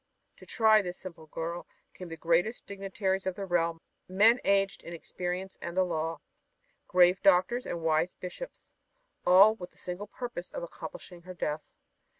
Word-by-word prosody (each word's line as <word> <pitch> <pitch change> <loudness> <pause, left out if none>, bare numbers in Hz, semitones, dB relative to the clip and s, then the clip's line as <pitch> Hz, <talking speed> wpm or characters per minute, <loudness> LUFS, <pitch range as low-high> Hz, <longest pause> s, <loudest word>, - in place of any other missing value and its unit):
To - - -15
try 220 -2 +5
this 180 -2 -6
simple 165 -4 -10
girl 165 +2 -5 0.3
came 180 -2 -9
the 165 - -7
greatest 170 +8 +1
dignitaries 195 -1 -2
of 185 - -1
the 200 - -4
realm 170 -2 0 0.3
men 215 +6 +5
aged 195 0 +2
in 170 - -9
experience 180 +3 -5
and 170 +1 -6
the 185 - +5
law, 165 -2 -2 0.7
grave 180 +1 +5
doctors 195 +6 +3
and 170 -1 -4
wise 160 +2 +1
bishops, 185 - -9 0.6
all 195 +4 +8
with 180 -5 -9
the - - -28
single 180 +3 -6
purpose 235 -6 -6
of - - -6
accomplishing 345 - -9
her 185 +1 -10
death. 150 -2 -2
180 Hz, 160 wpm, -30 LUFS, 170-200 Hz, 0.7 s, all